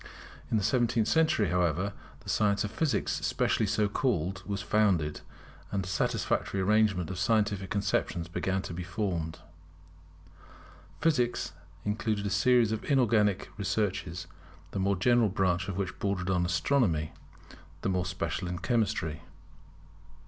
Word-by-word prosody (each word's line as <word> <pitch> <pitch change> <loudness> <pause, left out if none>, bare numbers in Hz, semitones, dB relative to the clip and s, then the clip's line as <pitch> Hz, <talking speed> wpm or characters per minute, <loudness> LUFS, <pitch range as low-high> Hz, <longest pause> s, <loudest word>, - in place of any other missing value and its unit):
In 110 - +2
the 105 - 0
seventeenth 115 +1 +2
century, 155 - +3
however, 90 +2 +1 0.3
the - - -10
science 100 -2 +2
of 105 - -3
Physics 145 +5 0
specially 110 - +1
so 105 +1 +2
called, 95 - -1
was 100 -1 -2
founded; 95 -9 +1 0.5
and 100 -1 -1
a - - -7
satisfactory 100 0 0
arrangement 100 -3 +2
of 90 - -5
scientific 100 -2 +1
conceptions 95 -4 -1
began 95 +2 -1
to 90 - -6
be 90 - -4
formed. 85 -3 -3 1.6
Physics 125 - +1 0.3
included 105 0 -1
a 100 - -1
series 120 +2 +4
of 110 - -2
inorganic 110 -8 +2
researches, 95 -3 -2 0.5
the 100 - -3
more 100 +1 +2
general 120 +4 +3
branch 90 -2 0
of 95 -2 -4
which 95 -2 -3
bordered 95 -2 -1
on 90 -1 +1
Astronomy, 85 - +1 0.7
the - - 0
more 90 -1 0
special 90 0 -3
on 90 0 -3
Chemistry. 100 - -1
100 Hz, 135 wpm, -29 LUFS, 90-110 Hz, 1.6 s, series